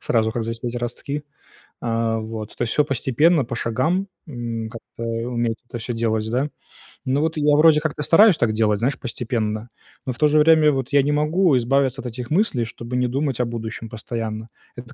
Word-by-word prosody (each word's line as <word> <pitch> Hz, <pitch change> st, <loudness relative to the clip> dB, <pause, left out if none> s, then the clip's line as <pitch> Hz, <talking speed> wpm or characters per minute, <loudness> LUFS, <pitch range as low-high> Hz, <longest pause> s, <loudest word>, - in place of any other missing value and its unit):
сразу, 110 Hz, -1 st, +1 dB
как 120 Hz, -1 st, -2 dB
засеять 115 Hz, +1 st, -4 dB
ростки, 120 Hz, +4 st, -4 dB, 0.6 s
а, 115 Hz, -1 st, 0 dB
вот. 110 Hz, -1 st, -6 dB
То -, -, -2 dB
есть, 115 Hz, -, -1 dB
всё 150 Hz, -, +3 dB
постепенно, 140 Hz, +3 st, +2 dB
по 120 Hz, -, -5 dB
шагам, 130 Hz, -, 0 dB, 0.2 s
м, 115 Hz, -5 st, -5 dB
как-то 115 Hz, 0 st, -11 dB
уметь 115 Hz, 0 st, -1 dB
это 120 Hz, -, -5 dB
всё 115 Hz, +2 st, -4 dB
делать 110 Hz, -2 st, -1 dB
да. 130 Hz, +5 st, 0 dB, 0.6 s
Ну, 135 Hz, +2 st, +1 dB
вот 160 Hz, +1 st, -1 dB
я 145 Hz, -1 st, +4 dB
вроде 155 Hz, 0 st, +6 dB
как-то 150 Hz, -1 st, -3 dB
стараюсь 190 Hz, +4 st, +6 dB
так 110 Hz, -2 st, +1 dB
делать, 105 Hz, -1 st, +2 dB
знаешь, 125 Hz, +4 st, 0 dB
постепенно, 115 Hz, -3 st, -3 dB, 0.4 s
но 130 Hz, -, -2 dB
в -, -, -14 dB
то 150 Hz, -, +4 dB
же 150 Hz, +1 st, +3 dB
время 155 Hz, 0 st, +6 dB
вот 135 Hz, -3 st, -2 dB
я 140 Hz, 0 st, +5 dB
не 145 Hz, +2 st, 0 dB
могу 150 Hz, +1 st, +3 dB
избавиться 135 Hz, +2 st, +1 dB
от -, -, -6 dB
этих 120 Hz, +1 st, -6 dB
мыслей, 155 Hz, -, +1 dB
чтобы 115 Hz, +2 st, -7 dB
не 125 Hz, 0 st, +2 dB
думать 135 Hz, 0 st, -1 dB
о 125 Hz, -, +2 dB
будущем 115 Hz, -1 st, -6 dB
постоянно. 110 Hz, 0 st, -5 dB, 0.3 s
Это, 120 Hz, +2 st, -10 dB
120 Hz, 195 wpm, -22 LUFS, 115-145 Hz, 0.6 s, вроде